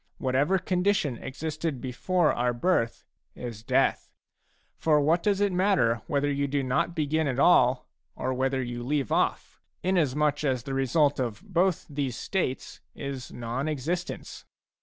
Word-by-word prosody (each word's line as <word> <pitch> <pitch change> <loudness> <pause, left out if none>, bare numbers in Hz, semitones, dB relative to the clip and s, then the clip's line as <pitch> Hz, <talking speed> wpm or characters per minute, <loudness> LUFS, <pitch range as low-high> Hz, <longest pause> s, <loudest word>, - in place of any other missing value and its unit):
Whatever 140 +8 +2
condition 180 - 0
existed 155 +1 -4
before 155 +8 +1
our 120 0 0
birth, 120 -5 0 0.3
is 115 -4 -7
death. 110 - +1 0.7
For 155 -2 +3
what 160 +4 +3
does 200 0 +1
it 205 -1 +3
matter 180 - +2
whether 145 0 +1
you 140 0 0
do 140 0 -1
not 130 +6 0
begin 155 0 0
at 130 -2 -1
all, 130 -4 +4 0.3
or 130 - -2
whether 130 +1 0
you 120 0 -5
leave 140 -1 -1
off, - - 0 0.2
inasmuch 150 -5 +1
as 130 -4 0
the 135 - -5
result 140 +2 +2
of 125 - -3
both 185 -3 +1
these 140 -4 -3
states 185 -10 -3
is 135 -3 -6
non 120 +5 -3
existence 155 +5 -4
140 Hz, 145 wpm, -27 LUFS, 130-170 Hz, 0.7 s, all